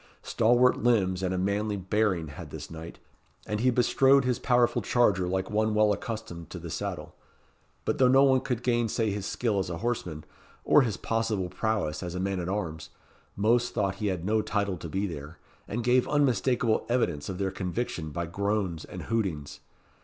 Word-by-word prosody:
Stalwart 120 +2 +3
limbs 95 -6 +2
and 95 -1 -1
a 95 - -1
manly 100 +2 0
bearing 95 -4 0
had 75 - -9
this - - -8
knight, 80 0 -8 0.5
and 105 0 -2
he 125 +3 +3
bestrode 130 +2 +4
his 125 -1 0
powerful 120 -1 +2
charger 100 -7 +2
like 95 +2 -2
one 110 0 +1
well 105 -1 +4
accustomed 100 -7 -6
to - - -7
the - - -7
saddle; - - -4 0.7
but - - -1
though 130 - +6
no 135 +2 +6
one 130 -1 +5
could 125 -3 -3
gainsay 120 -3 +1
his 100 0 -3
skill 110 -5 0
as 95 -2 -2
a 85 - -3
horseman, 90 -8 -3 0.4
or 150 - +6
his 110 -6 -1
possible 115 -5 -1
prowess 95 -6 -1
as 90 -1 -5
a - - -2
man 95 0 -1
at 90 0 -3
arms, 85 -6 -3 0.5
most 115 +4 +2
thought 95 0 0
he 105 - 0
had 90 -3 -2
no 110 +2 +2
title 100 -2 -1
to 85 - -7
be 95 +5 -1
there, 80 -3 -7 0.3
and 115 +3 -3
gave 125 +1 +3
unmistakable 125 -4 +2
evidence 115 - 0
of 95 - -4
their 95 0 -1
conviction 90 -3 -3
by 85 +3 -3
groans 100 -2 -2
and - - -8
hootings. 75 -11 -2
105 Hz, 185 wpm, -28 LUFS, 90-120 Hz, 0.7 s, though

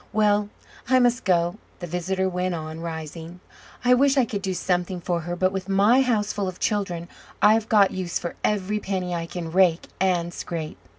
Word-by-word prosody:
Well, 210 -1 +2 0.4
I 260 - +5
must 245 -1 +2
go," 175 0 +2 0.2
the 175 - -6
visitor 185 +3 -1
went 180 -1 -1
on, 155 0 -6
rising. 165 +1 -7 0.5
"I 250 - +6
wish 275 +2 +4
I 260 - +5
could 205 -3 -4
do 190 -1 -2
something 180 +1 -1
for 175 0 -1
her, 175 +2 -4
but, 185 +1 +1
with 190 0 -5
my 205 +7 +5
houseful 210 -5 0
of 185 -1 -6
children, 180 -5 -1 0.3
I've 220 +1 +4
got 205 -3 +5
use 185 -2 -2
for 170 - -5
every 210 0 0
penny 185 -3 -3
I 165 -1 -3
can 175 -1 -6
rake 180 -2 +3
and 175 -2 +1
scrape." 160 -3 -5
185 Hz, 185 wpm, -24 LUFS, 175-205 Hz, 0.5 s, I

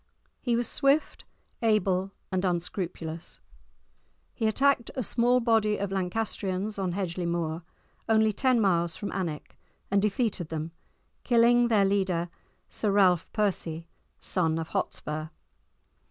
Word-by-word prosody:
He 240 -2 +1
was 240 0 +1
swift, 280 +4 +1 0.4
able, 195 -4 +2 0.2
and 185 0 0
unscrupulous. 175 -2 -3 0.9
He 225 - 0
attacked 270 +2 +2
a 255 - -1
small 245 +3 +3
body 225 -3 +2
of 200 -1 -3
Lancastrians 195 +1 -2
on 185 -2 -1
Hedgeley 180 -2 -2
Moor, 170 -1 -2 0.5
only 220 -1 +4
ten 255 +2 +2
miles 175 -5 +2
from 205 - -5
Alnwick, 170 -6 -5 0.3
and 200 0 +3
defeated 210 -5 -1
them, 160 0 -4 0.5
killing 240 0 +4
their 210 -4 +4
leader, 185 -3 0 0.4
Sir 215 - -2
Ralph 185 -4 +3
Percy, 170 -6 -1 0.3
son 165 -3 0
of 160 -1 -4
Hotspur. 155 +1 -3
195 Hz, 125 wpm, -28 LUFS, 175-225 Hz, 0.9 s, only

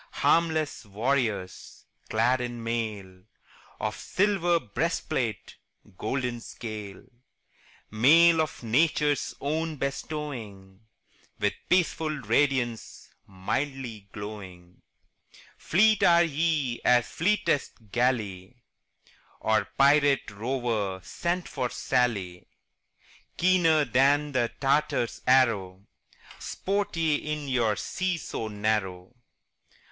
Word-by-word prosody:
Harmless 160 -4 +2
warriors, 110 -3 -2 0.2
clad 125 +3 +2
in 120 -1 -5
mail 105 -5 -4 0.6
Of 105 -2 -2
silver 185 - +1
breastplate, 105 - -3 0.4
golden 125 +3 -2
scale; 105 -5 -8 0.9
Mail 160 +9 +6
of 155 -5 -4
Nature's 145 +4 +1
own 155 +2 -2
bestowing, 130 -9 -5 0.6
With - - 0 0.2
peaceful 165 -3 +2
radiance, 130 -3 -1 0.2
mildly 110 +2 -4
glowing 95 -4 -9 0.7
Fleet 215 +4 +3
are 170 0 +6
ye 155 -5 0
as 120 -1 +4
fleetest 145 - -1
galley 110 -5 -1 0.8
Or 110 -2 +1
pirate 140 -3 +4
rover 110 -3 -2
sent 175 - -3
from 125 -3 -3
Sallee; 100 -11 -1 0.9
Keener 170 -4 +4
than 140 +4 +2
the 120 -3 0
Tartar's 135 -3 0
arrow, 105 -7 +2 0.5
Sport 200 -2 -2
ye 160 -3 +2
in 150 -1 -4
your 120 -5 +1
sea 185 - -2
so 115 -7 -5
narrow. 105 -2 -2
125 Hz, 90 wpm, -27 LUFS, 110-150 Hz, 0.9 s, Mail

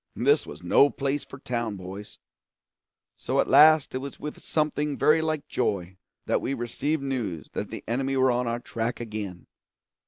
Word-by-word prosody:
This 435 - +3
was - - -10
no 140 - +5
place 140 +1 -2
for - - -11
town 120 -5 -3
boys. 95 +2 -9 1.0
So - - -1
at - - +3
last 155 -1 +6
it 130 - -1
was 140 +1 -8
with 150 - -7
something 150 -2 -1
very 155 +1 +4
like 155 -2 -2
joy 95 -6 -1 0.3
that - - +1
we 135 - -2
received 135 +5 -2
news 110 - -3
that - - -3
the - - -7
enemy 135 +3 0
were 130 0 +4
on 125 0 0
our 115 0 -1
track 115 0 -3
again. 105 -6 -6
130 Hz, 175 wpm, -26 LUFS, 110-145 Hz, 1.0 s, last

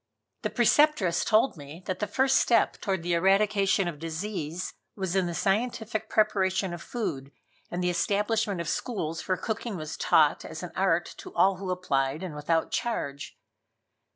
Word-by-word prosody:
The - - -1
Preceptress 240 - +3
told 220 +3 +3
me 150 +5 -10
that 185 - -3
the 210 - -1
first 265 0 +3
step 235 - +2
toward 190 -4 -1
the 175 0 0
eradication 195 +1 +3
of 160 -4 -5
disease 165 0 -4 0.2
was 190 -2 -2
in 190 -2 +2
the 170 - -4
scientific 220 +3 -1
preparation 190 -3 +1
of 175 - -7
food, 140 - -4 0.4
and 180 +1 -3
the 180 - +2
establishment 205 +3 0
of 170 - -3
schools 165 -7 -3
where 185 - +1
cooking 220 +1 -3
was 155 -1 -5
taught - - +3
as - - -7
an - - -6
art - - +1
to 370 - -9
all 190 0 +4
who 190 0 -5
applied, 150 -5 0
and 180 -4 -5
without 160 +2 0
charge. 140 - -3
190 Hz, 165 wpm, -28 LUFS, 170-215 Hz, 0.4 s, all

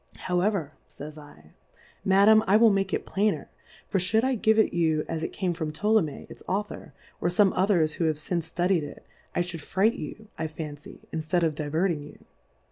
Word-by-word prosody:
However, 180 -3 0 0.2
fays 150 +1 -9
I, 145 - -15 0.5
Madam, 205 +3 +6
I 200 +3 +6
will 225 -1 +6
make 195 -1 0
it - - -2
plainer; 205 +2 -1 0.4
for 195 - 0
lliould 210 +5 +2
I 260 0 +2
give 220 -2 +2
it 220 - +3
you 160 -3 +1
as 160 - -3
it - - -3
came 185 -3 -1
from 160 -3 -3
Ptolomey 170 -2 0
its - - -12
Author, 205 +2 -3 0.3
or - - +1
fome 190 +2 +4
others 180 -5 +2
who 165 - -1
have 155 -2 +1
fince 165 +1 -3
ftudied 180 0 +1
it, 145 - -9 0.3
I 175 - +2
fhouW 175 -2 -6
fright 200 +9 +2
you, 220 -5 -8
1 160 - -2
fancy, 150 -2 -9
inftead 160 +2 0
of 160 -2 +2
diverting 155 +2 -1
you. 145 - -12
175 Hz, 190 wpm, -27 LUFS, 155-200 Hz, 0.5 s, Madam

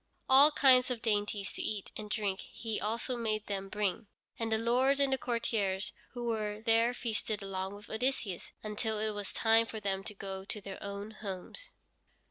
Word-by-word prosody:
All 275 +3 +9
kinds 260 -3 +6
of 245 -3 -3
dainties 205 -2 0
to - - -3
eat 210 -2 -2
and 210 -1 -6
drink 205 -3 -1
he 225 -2 -4
also 230 +4 -1
made 215 -3 -1
them 195 -1 -3
bring, 210 +1 -1 0.3
and 225 -1 -1
the 220 - +3
lords 255 +5 +3
and 275 -1 +3
the - - +2
courtiers 210 -5 0 0.2
who 240 -1 -4
were 215 -2 -1
there 230 +1 +4
feasted 220 -3 -2
along 190 0 -3
with 205 0 -12
Odysseus, 220 -5 -1
until 215 +1 -2
it 215 0 0
was 205 -1 -4
time 225 0 +4
for 220 - -5
them 195 -2 -1
to 210 - -5
go 190 -1 -6
to 210 +2 -3
their 195 -1 -8
own 200 +1 -5
homes. 210 - -7
215 Hz, 185 wpm, -32 LUFS, 200-235 Hz, 0.3 s, All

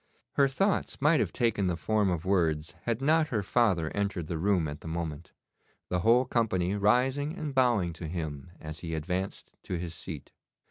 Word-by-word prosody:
Her 140 - +4
thoughts 195 +9 0
might 150 +3 +4
have - - 0
taken 110 -5 +1
the 90 -2 0
form 105 0 +1
of 85 -1 -2
words 80 -5 +1
had 120 +2 -1
not 155 +2 +4
her 110 -7 -1
father 95 -7 +2
entered 100 -4 -2
the 80 0 -3
room 90 -3 +2
at 75 +1 -6
the - - -9
moment, 80 0 -4 0.6
the 90 - +1
whole 115 +7 +4
company 105 -7 +1
rising 130 - +2
and 150 -3 -4
bowing 120 -10 +3
to 80 0 -7
him 80 -4 -5
as 75 0 -7
he 80 -1 -4
advanced 90 +5 -3
to 90 - -3
his 85 -1 -5
seat. 80 -2 -8
95 Hz, 185 wpm, -29 LUFS, 80-120 Hz, 0.6 s, Her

